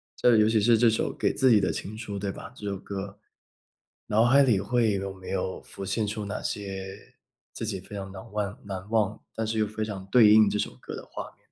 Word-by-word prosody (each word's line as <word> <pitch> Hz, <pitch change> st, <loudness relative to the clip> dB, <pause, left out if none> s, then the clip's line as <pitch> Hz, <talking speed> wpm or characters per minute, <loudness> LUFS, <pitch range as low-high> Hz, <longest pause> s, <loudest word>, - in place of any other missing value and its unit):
这 120 Hz, -2 st, +4 dB
尤 105 Hz, -, +5 dB
其 110 Hz, -1 st, +3 dB
是 115 Hz, +2 st, +5 dB
这 115 Hz, +1 st, +5 dB
首 110 Hz, -, 0 dB
《给 -, -, +1 dB
自 130 Hz, -1 st, +3 dB
己 110 Hz, -3 st, +6 dB
的 -, -, +1 dB
情 110 Hz, +2 st, -6 dB
书》， 105 Hz, -3 st, -6 dB
对 100 Hz, 0 st, -2 dB
吧？ 125 Hz, -, -10 dB
这 105 Hz, -5 st, -7 dB
首 100 Hz, -, -2 dB
歌， 100 Hz, +1 st, -6 dB, 0.9 s
脑 110 Hz, +2 st, +3 dB
海 140 Hz, +3 st, +6 dB
里 115 Hz, -7 st, +3 dB
会 115 Hz, +1 st, +2 dB
有 95 Hz, 0 st, -2 dB
没 95 Hz, -1 st, -11 dB
有 95 Hz, -1 st, -2 dB
浮 -, -, -8 dB
现 100 Hz, +3 st, -1 dB
出 105 Hz, +1 st, -3 dB
哪 100 Hz, +1 st, -4 dB
些 95 Hz, -1 st, -6 dB, 0.4 s
自 115 Hz, -, -4 dB
己 100 Hz, -3 st, -3 dB
非 105 Hz, -, -10 dB
常 95 Hz, -1 st, -6 dB
难 95 Hz, +3 st, -10 dB
万 105 Hz, -1 st, -2 dB
难 95 Hz, -1 st, -6 dB
忘， 110 Hz, -2 st, +1 dB, 0.2 s
但 115 Hz, -, -1 dB
是 110 Hz, 0 st, -2 dB
又 110 Hz, -, +3 dB
非 110 Hz, +1 st, -4 dB
常 100 Hz, -3 st, -5 dB
对 115 Hz, -4 st, +7 dB
应 110 Hz, 0 st, +7 dB
这 105 Hz, -, -1 dB
首 -, -, -1 dB
歌 -, -, -7 dB
的 -, -, -8 dB
画 -, -, -5 dB
面？ -, -, -32 dB
105 Hz, 260 characters per minute, -27 LUFS, 100-110 Hz, 0.9 s, 对